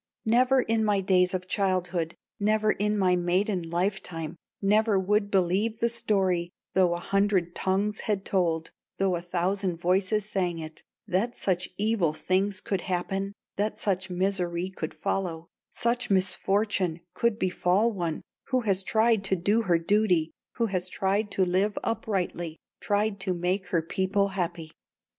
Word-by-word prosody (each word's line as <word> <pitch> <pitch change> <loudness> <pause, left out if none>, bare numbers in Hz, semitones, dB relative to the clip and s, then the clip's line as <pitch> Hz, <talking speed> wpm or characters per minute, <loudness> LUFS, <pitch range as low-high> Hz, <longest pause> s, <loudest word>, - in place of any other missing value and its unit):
"Never 250 +3 +4
in 225 0 +1
my 205 -2 +2
days 185 -1 +3
of 185 0 -4
childhood, 180 -4 0 0.2
Never 215 +1 +2
in 210 +1 0
my 185 -2 +3
maiden 180 +2 +1
life 175 +4 -1
time, 165 -2 -6 0.2
Never 210 0 +3
would 205 +2 +1
believe 195 +4 +1
the 235 +1 +1
story, 190 -6 0 0.2
Though 180 -2 +3
a - - -4
hundred 195 -2 +1
tongues 200 +2 0
had 200 -3 -1
told 165 -4 0
it, - - -33 0.2
Though 190 -2 +2
a 170 - -3
thousand 180 +1 -1
voices 190 +4 +1
sang 180 -5 -1
it, 155 -1 -8 0.2
That 220 +7 -1
such 180 -2 -1
evil 205 -7 +1
things 185 +4 0
could 195 -3 -2
happen, 195 +2 -2 0.2
That 210 +2 -1
such 190 -2 -1
misery 180 -1 -1
could 160 -4 -5
follow, 175 -4 -3 0.2
Such 240 +1 -1
misfortune 190 -2 +1
could 230 +3 +1
befall 185 +3 +2
one 170 -6 -3 0.2
Who 255 -1 +1
has 195 -4 +1
tried 220 +1 +2
to 190 - +2
do 200 +6 +2
her 180 -6 +2
duty, 175 -2 +2 0.2
Who 235 - 0
has 185 -3 -1
tried 200 +3 0
to 190 - +2
live 190 +4 +1
uprightly, 185 -8 -2 0.2
Tried 205 0 0
to 185 -1 -1
make 180 +2 -1
her 170 -2 0
people 190 +3 0
happy." 175 -4 -3
190 Hz, 155 wpm, -27 LUFS, 180-210 Hz, 0.2 s, Never